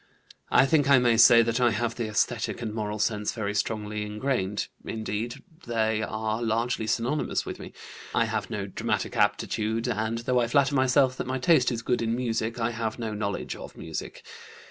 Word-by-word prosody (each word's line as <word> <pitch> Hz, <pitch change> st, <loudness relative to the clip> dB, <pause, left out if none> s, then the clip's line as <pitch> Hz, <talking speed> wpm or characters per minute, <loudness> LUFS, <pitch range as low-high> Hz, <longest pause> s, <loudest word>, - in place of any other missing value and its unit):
"I -, -, +5 dB
think 145 Hz, -1 st, +2 dB
I 140 Hz, -, +8 dB
may 120 Hz, -2 st, +4 dB
say 115 Hz, +1 st, +8 dB
that 115 Hz, +2 st, 0 dB
I 120 Hz, -, +5 dB
have 115 Hz, +1 st, -1 dB
the 115 Hz, -2 st, -3 dB
esthetic 115 Hz, +2 st, -1 dB
and 110 Hz, -2 st, -3 dB
moral 105 Hz, -1 st, -3 dB
sense 105 Hz, 0 st, 0 dB
very 105 Hz, -3 st, -3 dB
strongly 105 Hz, 0 st, -2 dB
ingrained. 105 Hz, -2 st, -2 dB, 0.2 s
Indeed, 110 Hz, +1 st, -4 dB, 0.2 s
they 110 Hz, -2 st, +1 dB
are 110 Hz, +1 st, -2 dB
largely 115 Hz, 0 st, 0 dB
synonymous 120 Hz, +7 st, 0 dB
with -, -, -6 dB
me. -, -, -9 dB, 0.4 s
I -, -, +3 dB
have -, -, -3 dB
no 105 Hz, -2 st, -3 dB
dramatic 95 Hz, -, -2 dB
aptitude, 110 Hz, +2 st, 0 dB
and, 110 Hz, -1 st, -1 dB
though 125 Hz, +2 st, +1 dB
I 120 Hz, -, +1 dB
flatter 140 Hz, +3 st, +3 dB
myself 130 Hz, 0 st, +3 dB
that -, -, -4 dB
my 130 Hz, +1 st, -1 dB
taste 135 Hz, -2 st, +4 dB
is 115 Hz, -1 st, -3 dB
good 125 Hz, 0 st, 0 dB
in 115 Hz, 0 st, 0 dB
music, 115 Hz, -1 st, -2 dB
I 115 Hz, +1 st, 0 dB
have 115 Hz, -1 st, -3 dB
no 115 Hz, -3 st, -4 dB
knowledge 105 Hz, -1 st, -3 dB
of -, -, -10 dB
music. 80 Hz, -2 st, -6 dB
115 Hz, 190 wpm, -27 LUFS, 110-125 Hz, 0.4 s, I